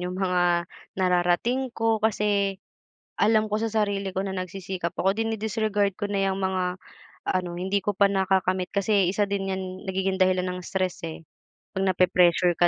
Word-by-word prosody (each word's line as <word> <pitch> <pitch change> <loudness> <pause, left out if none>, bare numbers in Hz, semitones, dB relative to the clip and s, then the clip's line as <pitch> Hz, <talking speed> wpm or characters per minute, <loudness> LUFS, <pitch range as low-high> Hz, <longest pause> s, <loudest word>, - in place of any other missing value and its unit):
yung 180 +1 -4
mga 175 -2 +1 0.3
nararating 185 +8 +1
ko. 225 -1 +1
Kasi 205 -2 +1 0.6
alam 215 0 +4
ko 210 - 0
sa 225 - 0
sarili 200 -3 0
ko 190 - 0
na 190 - -3
nagsisikap 185 -1 -4
ako, 195 +1 +2
dine-disregard 220 -2 0
ko 205 - -2
na 195 -1 +1
'yang 190 - -1
mga 185 -1 -1 0.6
ano, 185 -1 -1
hindi 190 +3 0
ko 205 - 0
pa 200 - +6
nakakamit. 190 -1 +1
Kasi 200 -2 +2
isa 205 +2 +1
din 195 -1 -2
'yan, 190 0 -2 0.3
nagiging 190 0 0
dahilan 185 0 +3
ng 180 0 -5
stress 185 -2 -2
eh, 160 0 -7 0.5
'pag 190 0 0
nape-pressure 180 -1 +4
ka 175 - +5
190 Hz, 165 wpm, -25 LUFS, 180-205 Hz, 0.6 s, pa